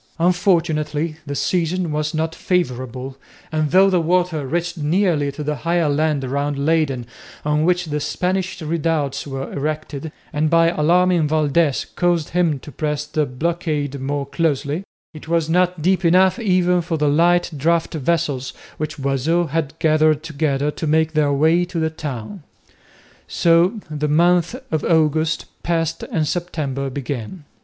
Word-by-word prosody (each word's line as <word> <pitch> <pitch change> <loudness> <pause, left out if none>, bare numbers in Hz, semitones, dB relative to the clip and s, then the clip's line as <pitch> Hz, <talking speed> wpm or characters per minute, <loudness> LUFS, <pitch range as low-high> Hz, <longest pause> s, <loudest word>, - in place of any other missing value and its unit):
Unfortunately 165 -3 +1
the 140 - -3
season 175 +1 0
was 150 0 -1
not 160 0 -2
favourable, 130 -7 -2 0.3
and 155 -1 0
though 190 +4 +6
the 185 -3 +2
water 170 -3 0
reached 170 +4 -2
nearly 155 -2 +1
to 150 +2 -6
the 150 0 -2
higher 165 +3 +1
land 150 -1 +1
round 140 +2 -2
Leyden 140 -4 +1 0.4
on 150 +1 +1
which 180 0 +2
the 150 -2 -2
Spanish 185 +4 -2
redoubts 155 -3 -1
were 135 -1 -5
erected, 150 0 -4 0.2
and 155 +1 +1
by 165 0 +4
alarming 175 +1 +3
Valdez 150 -1 +1
caused 175 -3 +1
him 170 -4 +1
to 150 - -10
press 150 +2 -2
the 150 0 -1
blockade 150 0 -2
more 140 +1 -2
closely, 145 +2 -1 0.3
it 155 0 -11
was 165 -1 +1
not 180 -1 +1
deep 190 +2 +2
enough 185 +2 +4
even 180 -4 +2
for 165 -1 -2
the 150 -1 +1
light 175 +5 +3
draught 165 +4 +1
vessels, 150 -3 -1 0.2
which 155 0 -4
Boisot 145 +5 0
had 160 0 -2
gathered 155 -2 +3
together, 150 -2 -1
to 160 - -4
make 160 +1 +2
their 150 -2 +2
way 160 +5 +3
to 175 -1 -4
the 160 0 0
town. 155 - -6 0.9
So 175 +5 +3
the 150 0 -2
month 175 +3 +3 0.2
of 155 -2 0
August 155 -1 +2 0.2
passed 165 -1 -1
and 155 -2 -2
September 145 -6 -3
began. 140 - -5
155 Hz, 150 wpm, -20 LUFS, 145-170 Hz, 0.9 s, though